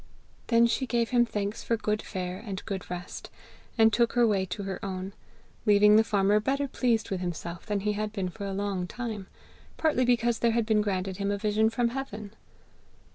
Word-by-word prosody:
Then 230 0 +5
she 255 +3 0
gave 235 0 0
him 240 -1 +4
thanks 205 -1 -3
for 230 - 0
good 215 0 -1
fare 185 0 -5
and 195 -4 -6
good 195 -3 -5
rest, 180 0 -6 0.5
and 225 -1 +5
took 235 +1 +2
her 240 -1 +4
way 200 -4 +2
to 200 +3 -5
her 195 -1 -5
own, 190 0 -4 0.5
leaving 210 0 +6
the 220 - +6
farmer 205 -1 +3
better 275 +6 0
pleased 235 -5 0
with 185 -2 -2
himself 170 0 -5
than 205 -2 -1
he 210 +1 0
had 210 0 -2
been 195 -4 -2
for 200 +3 -7
a - - -3
long 195 -2 -2
time, 220 -3 -5 0.5
partly 305 -6 +2
because 240 -2 +2
there 235 -1 +2
had 230 -1 +1
been 215 -1 +3
granted 190 -2 -2
him 200 0 -1
a 200 - 0
vision 215 +1 +2
from 235 +1 0
heaven. 220 -5 -6
210 Hz, 200 wpm, -28 LUFS, 195-230 Hz, 0.5 s, leaving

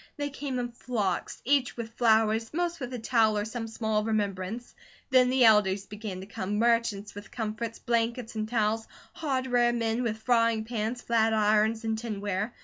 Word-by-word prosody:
They 290 -1 -3
came 275 -2 -4
in 240 -1 -3
flocks, 220 -6 -3
each 270 -2 +2
with 230 -1 -6
flowers, 225 -1 +2
most 345 0 -1
with 250 -2 -5
a 250 - -4
towel 225 -2 +2
or 205 - -1
some 225 +1 -5
small 220 -1 -1
remembrance; 210 +1 -2 0.4
then 255 -1 +5
the 255 -1 +4
elders 205 -3 +4
began 205 -2 -6
to - - -8
come, 200 0 -3
merchants 230 -3 +1
with 205 0 -10
comforts, 225 0 -4
blankets, 235 0 -1
and 215 -1 -3
towels, 220 -1 0 0.3
hardware 255 -5 +1
men 230 0 0
with 225 -3 -1
frying 230 -1 +2
pans, 230 +1 -3
flat 225 -1 +2
irons, 215 +1 +2
and 220 -1 -1
tinware. 205 -1 -3
225 Hz, 170 wpm, -28 LUFS, 215-240 Hz, 0.4 s, then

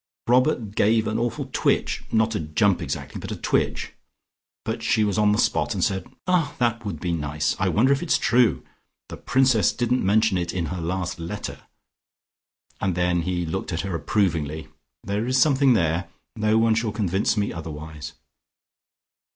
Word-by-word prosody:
"Robert 125 -4 +2
gave 110 +1 +3
an 110 +1 -1
awful 120 -1 -2
twitch, - - 0
not 110 0 +2
a - - -1
jump 85 +5 +1
exactly, 75 -5 -5
but - - -6
a - - -2
twitch. - - -1 0.7
But 110 +1 -3
she 115 -1 +2
was 105 -1 0
on 105 -1 +4
the 105 - +2
spot - - +1
and - - -1
said, 95 -1 -1 0.2
'Ah, 180 -6 +1
that 115 -2 0
would 100 - -5
be 90 - -2
nice. 75 -2 -1
I 95 -1 +1
wonder 120 - +3
if 140 - -2
it's 175 - +2
true. 115 - +2 0.5
The - - -7
Princess 130 -6 +3
didn't 120 +1 0
mention 105 0 +3
it 85 -1 -3
in 85 -2 -1
her 90 - -4
last 90 +1 -3
letter.' 90 +5 -6 1.2
And 95 -3 -1
then 90 -1 +1
he 90 0 -2
looked 95 +4 -4
at 80 - -1
her 95 -2 -4
approvingly. 80 -4 -1 0.3
There 105 +4 -2
is 130 +1 +2
something 140 -3 +4
there, 85 -3 0 0.3
no 110 0 +2
one 115 0 +4
shall 115 -1 0
convince 100 0 0
me 100 -1 0
otherwise." 80 -2 -7
100 Hz, 175 wpm, -24 LUFS, 85-115 Hz, 1.2 s, on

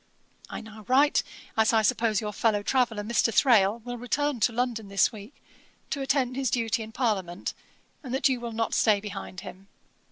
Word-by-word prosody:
I - - -6
now 220 0 -12
write, 280 +4 +4 0.3
as 220 +1 +3
I 220 -1 +4
suppose 225 -2 +1
your 210 -1 -4
fellow 205 -1 +1
traveller, 240 -3 +1
Mr. 230 +1 +1
Thrale, 220 -2 +4
will 245 -1 -5
return 280 +2 -1
to 225 - +3
London 230 -2 -2
this 195 +2 +2
week, 215 +3 -11 0.6
to 280 - -2
attend 265 -2 0
his 265 -2 0
duty 230 -2 0
in 220 0 -7
Parliament, 200 -8 -2 0.5
and 260 - -8
that 265 +3 +2
you 260 -2 0
will 235 -1 -5
not 225 0 -2
stay 215 -3 +3
behind 195 -2 -7
him. 190 0 -11
225 Hz, 185 wpm, -27 LUFS, 210-250 Hz, 0.6 s, write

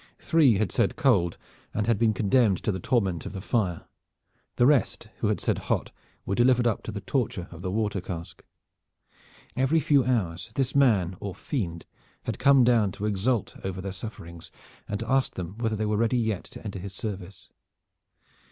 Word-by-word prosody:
Three 150 -8 +4
had 100 -2 0
said - - +1
cold, 85 -1 +2 0.4
and 105 - 0
had 115 -3 +1
been 110 -2 +3
condemned 105 -1 +2
to - - +1
the 95 - -3
torment 95 - 0
of - - -7
the 95 - -5
fire. 95 -4 -1 0.7
The 120 - +4
rest 135 -5 +2
who - - 0
had - - 0
said - - 0
hot - - 0 0.3
were - - -2
delivered 120 +2 +4
up 115 -3 +1
to - - -4
the 100 -1 -5
torture 115 -4 -2
of 85 0 -10
the 95 - -3
water 105 -1 -1
cask. 85 -1 -7 1.1
Every 135 +5 +3
few 140 -2 +3
hours 100 -7 -1
this 135 -1 0
man 100 -10 +3
or 100 -2 -5
fiend 85 - -4 0.4
had - - -4
come 135 -2 +6
down 115 -5 +3
to 105 - -4
exult 105 +2 0
over 95 -1 -4
their 95 +1 -4
sufferings 85 -5 -8 0.4
and 105 - -2
to 115 - -5
ask 135 +1 +1
them 95 +4 -6
whether 110 -2 0
they 110 0 -1
were 105 0 0
ready 115 +3 +2
yet 110 -5 -1
to - - -12
enter 100 -2 -5
his 95 +1 -8
service. 100 -3 -7
105 Hz, 190 wpm, -27 LUFS, 95-120 Hz, 1.1 s, come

